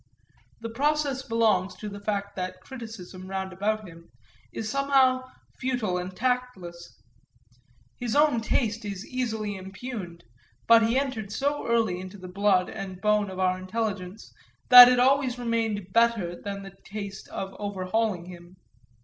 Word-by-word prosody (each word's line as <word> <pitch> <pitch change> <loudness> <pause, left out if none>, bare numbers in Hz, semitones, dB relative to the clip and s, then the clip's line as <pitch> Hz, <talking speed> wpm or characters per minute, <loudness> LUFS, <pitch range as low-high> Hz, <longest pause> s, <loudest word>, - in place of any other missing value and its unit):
That 230 0 -6
process 285 0 0
belongs 220 -6 +1
to 215 - -7
the 200 0 -7
fact 200 -1 -3
that 185 0 -4
criticism, 205 -6 -9
roundabout 195 +2 -2
him, 170 0 -14 0.4
is 220 - -5
somehow 260 0 +2 0.3
futile 245 -8 -1
and 180 +1 -4
tasteless. 235 -9 -3 1.0
His 240 -3 -3
own 295 -5 +4
taste 225 0 -1
is 200 -1 -5
easily 220 -5 -3
impugned, 190 -2 -7 0.4
but 230 0 +7
he 235 +3 +1
entered 240 -7 -2
so 285 +5 -1
early 225 -6 +1
into 185 +2 -9
the 185 -1 -9
blood 190 0 +2
and 195 -3 -7
bone 210 0 +2
of 190 - -8
our 185 0 +1
intelligence 200 0 -4 0.4
that 250 -1 +13
it 250 -1 +3
always 260 -1 +3
remained 225 -5 -2
better 230 -7 +2
than 200 +2 -6
the 195 0 -11
taste 200 -1 -7
of 195 0 -6
overhauling 200 -1 -1
him. 175 0 -12
210 Hz, 140 wpm, -26 LUFS, 185-240 Hz, 1.0 s, that